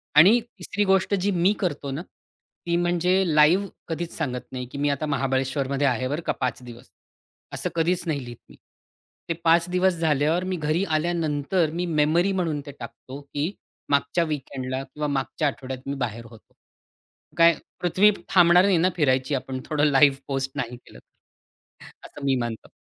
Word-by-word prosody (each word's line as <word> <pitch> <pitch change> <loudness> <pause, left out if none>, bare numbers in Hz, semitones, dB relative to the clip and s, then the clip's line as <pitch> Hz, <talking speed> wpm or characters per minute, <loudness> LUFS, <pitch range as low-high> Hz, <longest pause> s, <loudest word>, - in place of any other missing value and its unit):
आणि 190 +11 +7
तिसरी 205 -3 -4
गोष्ट 190 +1 +2
जी 200 +1 0
मी 180 +3 +3
करतो 145 -6 -2
ना, 140 +4 -4 0.7
ती 170 - +1
म्हणजे 175 +2 +2
लाईव्ह 165 +7 +5 0.2
कधीच 170 0 -4
सांगत 125 -6 -4
नाही, 125 -1 -5
की - - -7
मी 145 +1 +1
आता 140 +2 -1
महाबळेश्वरमध्ये 135 0 0
आहे 130 0 0
बरं 145 +5 -3
का - - +1
पाच 130 -1 -1
दिवस. 120 0 -12 0.6
असं - - -2
कधीच 170 +2 +1
नाही 145 -4 -1
लिहीत 120 -1 -9
मी. - - -15 0.7
ते - - +2
5 170 +1 +4
दिवस 180 +1 +2
झाल्यावर 155 +2 +1
मी 185 0 -2
घरी 155 +3 0
आल्यानंतर 160 0 0
मी 175 +2 -2
मेमरी 165 +3 +2
म्हणून 170 -6 -1
ते 145 - -7
टाकतो, 135 +2 -9
की 145 +4 -3 0.4
मागच्या 145 +4 +2
वीकेंडला 135 -4 -4
किंवा 150 +2 -5
मागच्या 140 +2 -1
आठवड्यात 130 -1 -6
मी 140 - -2
बाहेर 115 -3 -4
होतो. 115 -1 -17 0.8
काय 165 -1 +6 0.2
पृथ्वी 185 +4 +4 0.2
थांबणार 180 0 +6
नाही 195 -3 +3
ना 175 +3 +3
फिरायची 130 -3 +1
आपण 130 0 -4
थोडं 150 -1 +1
लाईव्ह 135 0 +5
पोस्ट 135 -1 -2
नाही 120 +1 -4
केलं - - -16 1.1
असं 140 - -9
मी 135 -1 +3
मानतो. 115 -2 -5
150 Hz, 165 wpm, -24 LUFS, 135-175 Hz, 1.1 s, आणि